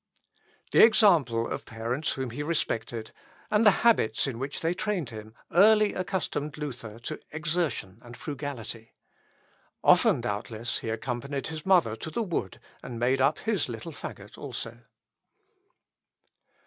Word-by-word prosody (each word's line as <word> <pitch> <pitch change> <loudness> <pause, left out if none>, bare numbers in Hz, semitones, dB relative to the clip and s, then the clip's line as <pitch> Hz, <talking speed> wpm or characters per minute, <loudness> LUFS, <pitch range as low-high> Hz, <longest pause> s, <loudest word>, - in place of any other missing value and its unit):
The - - +7
example 165 - +5
of - - -5
parents 120 +7 -2
whom 130 -3 -4
he 125 - -5
respected, 115 -7 -2 0.4
and 210 +1 +4
the 210 +1 +4
habits 215 - +4
in 130 -4 -3
which 140 +2 -4
they 165 +1 +1
trained 185 - -2
him, 110 0 -9 0.2
early 210 +3 +6
accustomed 180 -6 -2
Luther 125 -7 -6
to 155 +5 -5
exertion 155 - -2
and 120 0 -12
frugality. 130 -6 -6 0.9
Often, - - +5
doubtless, 110 +3 -2
he 115 - -5
accompanied 130 +4 -3
his 155 +2 -6
mother 170 - +4
to 160 - -5
the 225 +9 -1
wood, 165 - -3 0.2
and 120 -2 -7
made 130 +3 +2
up 140 +3 +3
his 210 - -1
little 115 +7 -6
faggot - - -9
also. - - -6
140 Hz, 135 wpm, -28 LUFS, 115-170 Hz, 0.9 s, The